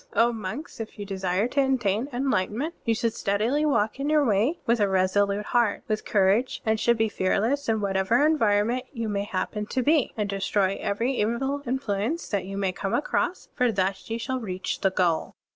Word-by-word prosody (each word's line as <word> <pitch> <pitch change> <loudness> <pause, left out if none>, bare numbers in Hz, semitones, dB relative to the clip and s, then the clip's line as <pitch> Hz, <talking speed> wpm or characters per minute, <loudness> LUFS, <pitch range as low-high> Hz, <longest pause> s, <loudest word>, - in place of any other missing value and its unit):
O 235 +1 +3
monks, 225 - -6
if 225 0 -7
you 205 - -5
desire 190 +1 -1
to 280 - +2
attain 250 -2 0
enlightenment, 250 - -1
you 230 - +2
should 230 0 0
steadily 230 +10 0
walk 225 -4 +1
in 280 +2 -1
your 305 -2 +4
Way, 225 - +1
with 235 -2 +2
a 205 - +3
reisolute 200 +2 +1
heart, 235 -3 +1
with 215 -2 -2
courage, 205 +5 +2
and 220 0 +1
should 235 +1 +3
be 225 0 +2
fearless 220 +7 0
in 220 -1 +1
whatever 200 +7 +2
environment 240 -4 +2
you 230 -5 -4
may 200 -1 -1
happen 210 +2 -3
to 255 - -1
be, 300 0 +3
and 210 -1 0
destroy 195 0 0
every 230 +6 0
evil 265 +6 0
influ 245 -6 -1
ence 325 +10 -2
that 200 -3 -1
you 195 +1 -6
may 195 -2 0
come 195 +1 -2
across; 355 +4 -1
for 250 -3 +2
thus 190 0 -1
you 225 - -1
shall 260 +2 -3
reach 185 -5 -4
the 195 - +3
goal." 175 -4 0
220 Hz, 195 wpm, -26 LUFS, 200-255 Hz, -, your